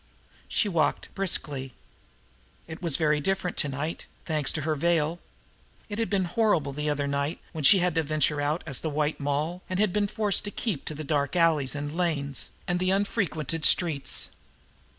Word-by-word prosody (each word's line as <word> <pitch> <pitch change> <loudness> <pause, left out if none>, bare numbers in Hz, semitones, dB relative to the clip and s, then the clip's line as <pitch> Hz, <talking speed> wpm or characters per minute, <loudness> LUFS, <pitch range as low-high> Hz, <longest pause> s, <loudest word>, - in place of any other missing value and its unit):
She 215 - +1
walked 165 -6 0
briskly. 145 -9 -1 0.9
It 160 +1 -9
was 165 -6 +2
very 150 -2 +2
different 190 +2 -1
to 145 - 0
night, 145 +5 -4 0.2
thanks 155 -4 +2
to 155 - -2
her 155 +1 0
veil! 165 +1 +1 0.7
It 205 +1 -4
had 225 - 0
been 195 -3 +1
horrible 175 -6 +1
that 150 +2 -2
other 145 -1 0
night, 140 +2 -1
when 155 -2 -5
she 195 - +9
had 180 - +1
ventured 155 -1 +1
out 150 +4 -1
as 135 - -2
the 160 - -3
White 150 +1 -1
Moll 150 +5 -1
and 185 0 -2
had 210 -4 +2
been 210 -1 +1
forced 210 -2 +1
to - - -2
keep 205 - -3
to 155 - -4
the 155 - -5
dark 145 0 0
alleyways 160 -6 +3
and 145 +1 -4
lanes, 150 -6 -1 0.2
and 180 -1 0
the 185 0 +1
unfrequented 185 - 0
streets! 155 -5 +2
160 Hz, 180 wpm, -27 LUFS, 145-180 Hz, 0.9 s, she